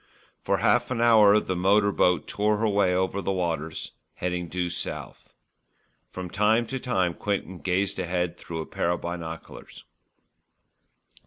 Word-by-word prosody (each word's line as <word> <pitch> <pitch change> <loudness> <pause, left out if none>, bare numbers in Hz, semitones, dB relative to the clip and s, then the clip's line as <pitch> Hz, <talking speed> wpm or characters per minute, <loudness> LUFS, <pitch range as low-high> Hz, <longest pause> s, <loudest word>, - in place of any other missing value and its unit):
For - - +1
half 120 0 +2
an 130 -2 -2
hour 110 -3 +6
the 95 - -3
motor 100 +3 +3
boat 90 -4 +2
tore 105 +1 +1
her 110 +1 +1
way 100 -3 +2
over 95 +2 0
the 95 - -1
waters, 85 -4 -3 0.2
heading 90 -1 -3
due 90 +1 -2
south. - - -6 0.7
From 95 0 -6
time 105 +5 +2
to 130 +3 -4
time 95 -9 0
Quinton 95 -2 -3
gazed 95 +1 -1
ahead 90 -1 -1
through 85 -2 -6
a - - -6
pair - - -2
of 85 - -1
binoculars. 85 -2 -7
95 Hz, 150 wpm, -26 LUFS, 90-105 Hz, 0.7 s, hour